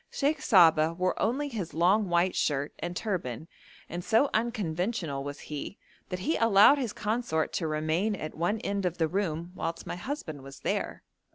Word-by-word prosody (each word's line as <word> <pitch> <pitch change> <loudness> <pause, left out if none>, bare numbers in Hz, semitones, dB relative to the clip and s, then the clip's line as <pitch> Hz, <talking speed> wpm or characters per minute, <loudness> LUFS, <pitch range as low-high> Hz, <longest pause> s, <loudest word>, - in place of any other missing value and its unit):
Sheikh 295 +2 0
Saba 165 -5 +5
wore 185 +1 +1
only 265 +7 +1
his 210 - -5
long 190 +4 +3
white 175 +1 +2
shirt 145 -1 0
and 175 - -4
turban, 165 - -3 0.4
and 175 +1 -5
so 225 +8 +3
unconventional 185 - -1
was 145 0 -6
he 150 +6 -6 0.3
that 180 -1 -4
he 315 - 0
allowed 230 +5 +6
his 245 -5 -2
consort 210 -8 -1
to 165 - -1
remain 155 +7 0
at 155 -5 -6
one 175 +7 0
end 200 -2 -1
of 175 - -4
the 165 -2 +2
room 170 -2 -2
whilst 165 -2 -4
my - - -5
husband 175 - -5
was 135 +1 -11
there. - - -2
180 Hz, 175 wpm, -29 LUFS, 160-215 Hz, 0.4 s, allowed